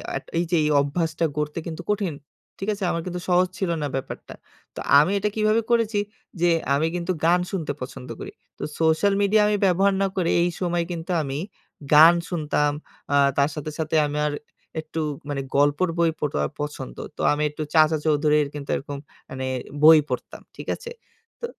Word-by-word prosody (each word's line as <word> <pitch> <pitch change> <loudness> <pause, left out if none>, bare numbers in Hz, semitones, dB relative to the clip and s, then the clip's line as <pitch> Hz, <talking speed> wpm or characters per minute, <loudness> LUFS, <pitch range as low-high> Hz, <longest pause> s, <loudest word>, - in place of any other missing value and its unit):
আট - - -4
এই - - +2
যে - - +3
এই 150 - +1
অভ্যাসটা 160 +3 -1
গড়তে 150 +2 -2
কিন্তু 165 +1 -5
কঠিন, 200 -5 -1 0.5
ঠিক 195 - -3
আছে? 200 -1 -6
আমার 170 - -2
কিন্তু 180 -1 -4
সহজ 180 +1 +4
ছিল 190 - -1
না 145 - -1
ব্যাপারটা। 135 - -6 0.4
তো - - -6 0.2
আমি 150 +6 +3
এটা 210 +1 0
কিভাবে 215 +1 +2
করেছি? 225 -3 +2 0.4
যে 175 - +4 0.2
আমি 150 +3 +2
কিন্তু 175 +1 -2
গান 175 +2 +5
শুনতে 170 -6 -2
পছন্দ 125 0 -7
করি। - - -7 0.3
তো - - -7 0.2
সোশ্যাল 160 +5 +3
মিডিয়া 210 +1 +4
আমি 210 - +2
ব্যবহার 195 +2 +3
না 195 - +3
করে, 175 -3 0
এই 175 - +2
সময় 175 -2 0
কিন্তু 170 +2 -5
আমি 140 -2 -3 0.6
গান 160 +3 +9 0.2
শুনতাম। 150 -3 0 0.4
আ - - +4 0.2
তার 140 +1 +3
সাথে, 150 0 -5
সাথে 160 +1 -1
আমার 150 0 -1 0.5
একটু 160 +1 -5 0.3
মানে 140 -1 -2
গল্পর 145 +5 +3
বই 170 -1 +3
পড়া 135 - -1 0.2
পছন্দ। 150 - -6 0.2
তো - - -4
আমি 150 +1 -1
একটু 150 +1 -5
চাচা 155 0 +5
চৌধুরীর 150 -1 +3
কিন্তু 140 -1 -7
এরকম 145 0 -5 0.3
মানে 130 0 -4 0.4
বই 160 0 +9
পড়তাম। - - -5
ঠিক - - -9
আছে? 475 -1 -9 0.5
তো - - -4
160 Hz, 180 wpm, -24 LUFS, 150-185 Hz, 0.6 s, গান